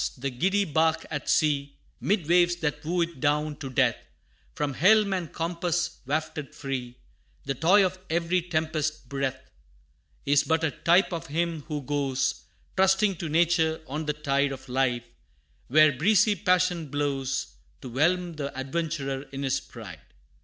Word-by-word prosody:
the 135 +2 -3
giddy 190 +10 +1
bark 160 0 +1
at 145 -2 -4
sea, 145 -3 +1 0.2
'Mid 195 -5 0
waves 175 +1 +4
that 150 -3 -3
woo 175 +3 0
it 170 -4 -3
down 150 +2 +1
to 140 -3 -6
death, 125 -2 +1 0.5
From 145 -2 -1
helm 200 +6 +4
and 175 -5 -3
compass 170 0 -2
wafted 155 0 -3
free, 125 -3 -5 0.5
The 135 - -1
toy 185 +9 +4
of 185 0 -3
every 170 +2 +1
tempest's 155 -2 -1
breath, 130 0 -4 0.7
Is 145 0 +4
but 160 0 +1
a 160 - +1
type 175 +5 +3
of 165 -1 -4
him 165 +1 -1
who 150 -3 -4
goes, 140 -1 -1 0.3
Trusting 190 0 +3
to 170 -2 -4
nature, 160 0 +2
on 150 +2 -5
the 150 - +1
tide 140 -1 0
Of 135 0 -8
life, 125 -2 0 0.6
where 155 +3 +6
breezy 205 - +3
passion 180 -4 +1
blows, 135 -2 -2 0.3
To 130 - -7
whelm 170 +6 +1
the 140 -2 -3
adventurer 140 -1 -3
in 135 0 -5
his 135 0 +1
pride. 110 -8 -11
155 Hz, 155 wpm, -27 LUFS, 140-170 Hz, 0.7 s, where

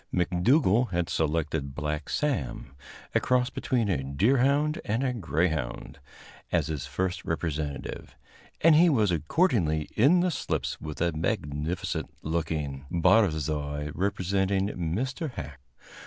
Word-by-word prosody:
McDougall 105 - +3
had 85 -2 -1
selected 75 -3 -1
Black 75 0 -3
Sam, 70 - -2 0.4
a - - +4
cross 125 0 +1
between 120 -3 0
a 85 -9 0
deerhound 135 - +2
and 115 +5 -1
a 130 -2 0
greyhound, 80 - -2 0.5
as 85 -4 +2
his 75 -3 -4
first 90 +6 -2
representative, 75 -4 -4 0.5
and 165 0 +7
he 170 +3 +6
was 110 - +3
accordingly 85 - +1
in 150 +11 +5
the 180 0 +1
slips 80 - -3
with 75 -2 -6
a 85 0 +2
magnificent 75 +1 -2
looking 75 -4 -3
barzoi 80 -6 +1
representing 95 +1 0
Mr. 120 - -3
Hacke. 75 - -7
85 Hz, 120 wpm, -27 LUFS, 75-115 Hz, 0.5 s, and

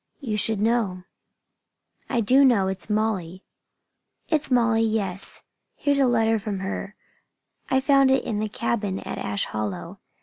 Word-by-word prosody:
"You 240 -7 -3
should 215 0 +1
know." 210 -5 0 1.1
"I 240 - +1
do 260 +6 +5
know. 230 -8 +4
It's 190 +2 -5
Molly!" 205 -4 -1 0.9
"It's 305 -3 +1
Molly, 235 -3 +3
yes. 205 -4 -1 0.3
Here's 285 -1 +1
a 270 - +4
letter 225 -2 +2
from 200 -2 -4
her. 195 +1 -5 0.7
I 265 0 +2
found 275 -1 +4
it 265 0 +3
in 210 -2 -2
the 215 0 -2
cabin 205 -3 -2
at - - -6
Ash 100 -1 -1
Hollow. 100 -5 -5
220 Hz, 145 wpm, -24 LUFS, 195-245 Hz, 1.1 s, do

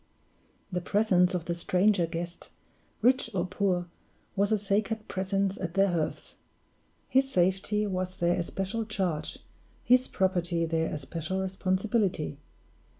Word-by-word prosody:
The 180 -1 -1
presence 185 -2 +3
of 170 -2 -3
the 170 - -1
stranger 180 +1 +2
guest, 170 +1 -6 0.5
rich 255 0 +4
or 175 -1 +1
poor, 185 -1 0 0.5
was 200 +2 +2
a 215 - +4
sacred 210 +2 -1
presence 195 +1 -1
at 175 -2 -4
their 195 0 +4
hearths. 165 -3 -3 0.7
His 270 +1 +3
safety 190 +3 +2
was 185 -2 -2
their 175 0 +2
especial 195 +5 -2
charge, 190 -8 -2 0.5
his 250 +1 +4
property 175 -3 +1
their 160 0 0
especial 160 +5 -3
responsibility. 190 -4 0
185 Hz, 125 wpm, -29 LUFS, 175-205 Hz, 0.7 s, rich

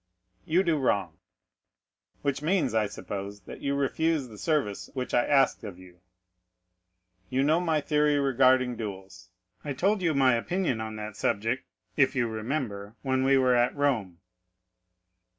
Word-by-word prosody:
"You 175 +4 +2
do 165 -4 +1
wrong." 95 -10 0 1.0
"Which 140 -1 -1
means, 180 0 +1
I 110 -2 +2
suppose, 100 0 -7
that - - -11
you 140 0 -1
refuse 140 0 0
the 110 - -12
service 145 -11 -1
which 130 -1 -4
I 120 - +4
asked 135 -4 +3
of 100 -5 -7
you?" 90 -1 -16 1.3
"You 130 +1 +1
know 155 +4 +3
my 160 -4 +1
theory 150 0 +2
regarding 130 -2 +3
duels; 95 -5 -8 0.3
I 145 - -3
told 195 +9 +1
you 165 -4 +1
my 130 -2 +4
opinion 135 0 -1
on 110 0 -5
that 105 -1 -7
subject, 115 +7 -1 0.3
if 135 -2 +3
you 120 -2 +1
remember, 110 -2 -4
when 130 -1 +1
we 135 +1 +4
were 130 -1 +3
at 120 0 +2
Rome." 120 -12 0
130 Hz, 150 wpm, -27 LUFS, 110-145 Hz, 1.3 s, I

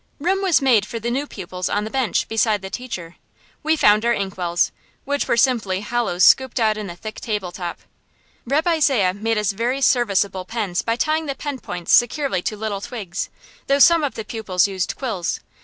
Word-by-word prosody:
Room 375 +6 0
was 360 -7 +3
made 245 -6 +4
for 230 - -5
the 235 +2 -3
new 275 +4 -1
pupils 185 -4 -5
on 205 - 0
the 215 - -6
bench, 260 -5 0
beside 215 -2 +1
the 190 - -7
teacher. 185 -9 -6 0.4
We 315 +1 +2
found 210 -7 +4
our 235 0 +3
inkwells, 180 -3 -1 0.3
which 285 +1 -1
were 235 - +1
simply 220 -7 +2
hollows 210 -5 0
scooped 260 +5 +5
out 215 -2 +3
in 210 -1 -5
the 175 - -7
thick 215 +4 -8
table 210 -5 -3
top. 175 -1 -6 0.7
Reb' 295 +6 +1
Isaiah 275 - +3
made 225 +3 -1
us 210 -2 +1
very 235 +6 -1
serviceable 200 -7 +2
pens 195 -3 -2
by 230 - -1
tying 310 +5 0
the 275 - -2
pen 285 -2 -5
points 175 -5 -3
securely 250 - +3
to 215 - -3
little 205 -2 -3
twigs; 195 -7 -5 0.4
though 275 - +3
some 330 +3 +6
of 285 - -2
the 220 - -5
pupils 205 -5 0
used 190 -2 -3
quills. 215 -10 -3
220 Hz, 195 wpm, -21 LUFS, 190-265 Hz, 0.7 s, some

